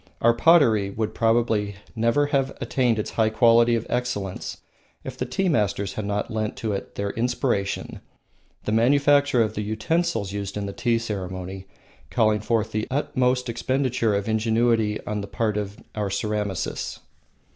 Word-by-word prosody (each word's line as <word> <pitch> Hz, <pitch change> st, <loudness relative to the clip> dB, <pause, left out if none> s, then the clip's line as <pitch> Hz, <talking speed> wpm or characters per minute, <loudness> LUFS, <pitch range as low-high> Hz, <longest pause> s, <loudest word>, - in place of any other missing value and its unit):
Our 120 Hz, 0 st, +4 dB
pottery 115 Hz, -9 st, +4 dB
would 110 Hz, +2 st, -3 dB
probably 115 Hz, -3 st, +1 dB, 0.2 s
never 115 Hz, +6 st, +2 dB
have 135 Hz, -1 st, +1 dB
attained 125 Hz, -4 st, +1 dB
its 105 Hz, -, -3 dB
high 110 Hz, -1 st, +2 dB
quality 115 Hz, +1 st, +5 dB
of 115 Hz, -, -2 dB
excellence 120 Hz, -6 st, -3 dB, 0.5 s
if 130 Hz, -, -6 dB
the 125 Hz, -1 st, -3 dB
tea 190 Hz, +10 st, 0 dB
masters 100 Hz, -, 0 dB
had 105 Hz, -, -4 dB
not 105 Hz, +3 st, -2 dB
lent 110 Hz, -1 st, -2 dB
it -, -, -25 dB
to 105 Hz, -3 st, -3 dB
their 100 Hz, 0 st, -2 dB
inspiration, 120 Hz, -4 st, -1 dB, 0.6 s
the -, -, -2 dB
manufacture 140 Hz, +2 st, +4 dB
of 110 Hz, -, -2 dB
the 105 Hz, -, -3 dB
utensils 110 Hz, -, -1 dB
used 100 Hz, 0 st, -4 dB
in 100 Hz, -, -2 dB
the 100 Hz, -, -5 dB
tea 120 Hz, +2 st, +1 dB
ceremony 95 Hz, -3 st, -5 dB, 0.4 s
calling 110 Hz, -3 st, +2 dB
forth 110 Hz, +1 st, 0 dB
the 110 Hz, 0 st, -2 dB
utmost 130 Hz, -2 st, 0 dB
expenditure 125 Hz, -1 st, 0 dB
of 100 Hz, +1 st, -2 dB
ingenuity 110 Hz, -1 st, +2 dB
on 105 Hz, -1 st, -2 dB
the 100 Hz, -, -6 dB
parts 105 Hz, -1 st, -1 dB
of 100 Hz, 0 st, -5 dB, 0.2 s
our 105 Hz, -2 st, -2 dB
ceramists. 105 Hz, -2 st, -3 dB
110 Hz, 155 wpm, -24 LUFS, 105-125 Hz, 0.6 s, quality